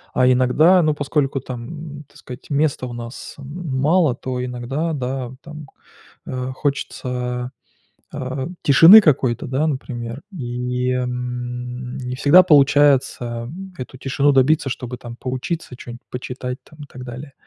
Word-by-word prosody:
а 125 - +4
иногда, 150 +9 +5
ну 155 -2 +1
поскольку 145 -2 -1
там, 145 +5 -8
так 145 - -21
сказать, 125 0 -11
места 140 -3 0
у 120 - -7
нас 120 +1 -8
м 145 0 -5
мало, 155 -4 +3
то 125 -1 -4
иногда, 130 +7 -3
да, 130 -2 -3
там, 150 -1 -10 0.6
э, 130 0 -4
хочется, 125 -3 -3 0.6
а, 130 -1 -4 0.2
тишины 165 +9 +9
какой-то, 135 - +2
да, 135 +5 0
например, 125 -3 -4
и, 125 -4 -3
м, 125 0 -4
не 125 0 -5
всегда 145 +7 +7
получается 140 -6 +3 0.3
эту 130 0 -8
тишины 140 +2 +2
добиться, 135 +2 +3
чтобы 125 0 -5
там 120 -1 -10
поучиться, 130 +4 -4
чё-нибудь 120 0 -10
почитать 125 0 -5
там 155 +3 -19
и - - -9
так 125 -1 -10
далее. 130 +3 -9
130 Hz, 135 wpm, -21 LUFS, 125-145 Hz, 0.6 s, тишины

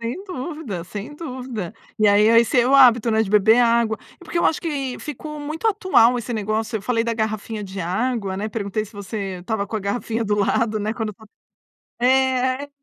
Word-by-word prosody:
Sem 240 - -5
dúvida, 295 - -5
sem 210 +10 -7
dúvida. 250 - -6 0.2
E 215 - +4
aí, 205 +2 +5
a 230 - +7
esse 235 +2 +3
é 240 - +2
o 275 - +3
hábito, 240 -4 +6
né, 220 0 +3
de 200 - -4
beber 215 +2 +5
água 230 -2 +3 0.2
é - - -13
porque 340 - -3
eu - - +1
acho 320 - +2
que 275 -6 -3
ficou 300 +1 -7
muito 310 +8 -4
atual 250 - +4
esse 240 +1 -5
negócio, 220 +1 -2
eu 200 - -6
falei 230 0 0
da 230 - -1
garrafinha 220 -1 -3
de 195 0 -6
água, 195 +2 -1
né, 210 +3 -3
perguntei 215 -1 -3
se 215 - -16
você 200 -2 -5
estava 200 +1 -2
com 220 - -4
a - - -3
garrafinha 225 +3 -2
do 210 0 +1
lado 215 +2 +1
né, 215 +2 -1
quando 220 -3 -4
fal 220 - -16 0.8
é, 260 +1 +2
230 Hz, 210 wpm, -22 LUFS, 210-255 Hz, 0.8 s, a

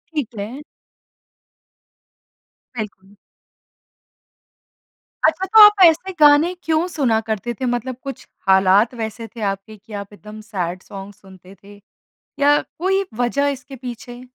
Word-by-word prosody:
ठीक 285 -7 -1
है। 240 +8 -6 2.2
बिल्कुल। 200 -2 -8 2.1
अच्छा 380 - 0
तो 435 +3 +6
आप 415 -2 +8
ऐसे 335 +4 +3
गाने 300 +4 +5
क्यों 320 +2 0
सुना 255 -10 0
करते 220 +1 -4
थे? 255 +3 -5
मतलब 245 +1 -2
कुछ 275 -1 -8 0.2
हालात 190 +5 +4
वैसे 220 +1 -5
थे 225 - -8
आपके 195 +2 -7
कि 215 +2 -16
आप 200 0 -7
एकदम 210 +1 -12
सैड 185 -4 -4
सॉन्ग 195 0 -10
सुनते 190 0 -17
थे? 205 0 -15 0.6
या 290 +1 +5
कोई 385 +3 -1 0.2
वज़ह 280 +4 +1
इसके 270 0 -7
पीछे? 245 0 -9
235 Hz, 125 wpm, -20 LUFS, 200-290 Hz, 2.2 s, आप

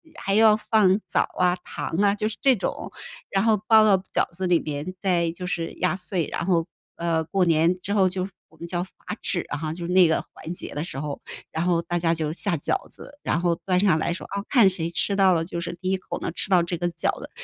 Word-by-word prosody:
还 195 - -2
要 220 -1 +7
放 210 -3 +3
枣 - - +2
儿 180 - -1
啊、 - - -2
糖 - - -5 0.2
啊， 200 0 +4
就 210 +1 -1
是 220 - -5
这 270 -3 +5
种， 195 - -4 0.4
然 195 +1 +1
后 220 -2 +4
包 220 -1 +7
到 200 -3 +5 0.2
饺 - - +1
子 185 +2 -4
里 175 -2 +4
边， 150 +4 -5
再 170 -4 +1
就 180 +2 -7
是 165 -2 -3
压 180 0 0
碎， 185 -3 -2
然 - - -2
后， 170 -3 +2 0.3
呃， 165 -1 0
过 185 +2 +1
年 165 +2 +3
之 200 - -2
后 190 -3 +4
就 185 +1 -3 0.2
我 160 - -22
们 170 - -7
叫 175 0 -1
罚 190 - -13 0.3
纸 175 - -1
哈， 155 +1 -3
就 170 0 -6
那 180 -1 +5
个 160 - +1
环 170 - -7
节 - - -5
的 150 +2 -3
时 135 -5 -5
候， 145 -1 -5 0.3
然 160 - -1
后 170 -1 +1
大 175 0 -1
家 165 0 +2
就 155 -1 -2
下 175 -2 0
饺 385 - -2
子， 285 - -12
然 170 - 0
后 170 -1 +1
端 180 -1 +2
上 185 -6 +3
来 170 - 0
说， 175 - -5
啊， 200 0 -2
看 235 -8 +6
谁 170 -3 -1
吃 185 +4 0
到 190 -2 +5
了 165 0 0
就 170 -1 -5
是 170 0 -5
第 185 0 -2
1 190 - +2
口 - - -6
能 - - -4
吃 - - -4
到 180 -3 +5
这 175 0 -3
个 175 +1 -1
饺 170 - -1
子， - - -8
180 Hz, 270 characters per minute, -24 LUFS, 165-195 Hz, 0.4 s, 要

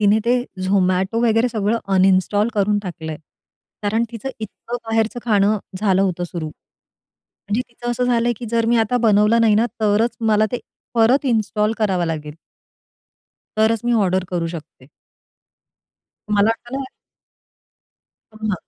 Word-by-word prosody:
तिने 210 +1 +4
ते 240 - +3 0.3
Zomato 190 +3 +1
वगैरे 225 +2 +3
सगळं 220 0 0 0.2
अनइंस्टॉल 190 +3 +3
करून 205 0 +2
टाकलंय, 160 -4 -6 0.7
कारण 220 +3 +1
तिचं 230 +4 -5
इतकं 220 +3 -6
बाहेरचं 225 +2 0
खाणं 210 -1 +3 0.2
झालं 195 -2 +2
होतं 180 -2 -1
सुरु. 170 -2 -5
म्हणजे 205 +7 -9
तिचं 240 0 -6
असं 245 +1 0
झालंय 240 -1 +2
की 240 - -6
जर 230 -1 +1
मी 235 +1 +3
आता 225 +2 +1
बनवलं 210 +2 +4
नाही 220 -2 +4
ना, 225 +3 +3
तरच 215 +2 +2
मला 215 0 +4
ते 245 - -1 0.4
परत 240 +5 +4
इन्स्टॉल 215 -2 +1
करावं 190 -5 +1
लागेल. 150 -2 -4 1.2
तरच 220 0 +3
मी 240 - +1
ऑर्डर 185 -1 +1
करू 175 -2 -1
शकते. 140 -4 -14 1.4
मला 205 +1 +4
वाटलं 255 +4 -4 1.5
हो - - -13
ना, 205 - +1
215 Hz, 140 wpm, -20 LUFS, 190-230 Hz, 1.5 s, तिने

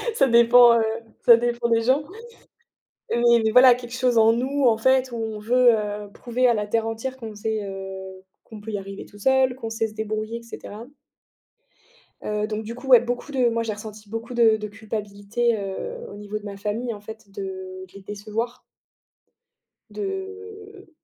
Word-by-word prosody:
ça 270 - +4
dépend, 235 0 +7
heu, - - +2 0.4
ça 235 - +9
dépend 240 0 -1
des 230 -1 +3
gens 260 +6 +2 1.1
mais 235 -2 +4
voilà, 250 +1 +8
quelque 240 -1 -9
chose 250 -1 +1
en 225 0 +6
nous, 265 +4 -1
en 230 -3 +4
fait, 260 +2 +2
où - - -4
on 220 -2 -4
veut, 245 +3 +4
heu, 210 -1 -4
prouver 250 +1 0
à 240 - +4
la 210 -1 -2
terre 225 +1 0
entière 230 +4 -4
qu'on 225 -3 -8
sait, 215 +1 -3
heu, 190 -1 -8 0.2
qu'on 220 - -11
peut 220 - -7
y 205 - -1
arriver 195 0 -8
tout 205 - -16
seul, 265 +3 +3
qu'on 245 -3 -6
sait 225 0 -1
se - - -13
débrouiller 215 +1 -3
et - - -14
cetera. 230 -1 -9 1.4
Heu, 210 0 -2
donc 215 0 -4
du 230 +2 -6
coup, 250 +2 -10
ouais, 250 -2 +8
beaucoup 245 +4 -4
de 255 -3 +2
moi 230 0 -1
j'ai 225 - -3
ressenti 210 0 -10
beaucoup 225 +3 -6
de 230 -2 +4
de 210 0 -5
culpabilité, 215 +2 -2
heu, 200 - -5 0.2
au - - -9
niveau 205 +1 -6
de 210 - -11
ma 200 -1 -7
famille, 220 +4 -3
en 205 - -9
fait, 220 0 -11
de 195 - -9 0.5
de - - -26
les 200 - -11
décevoir. 215 +5 -5 1.3
De 405 0 -7
225 Hz, 190 wpm, -23 LUFS, 210-245 Hz, 1.4 s, ça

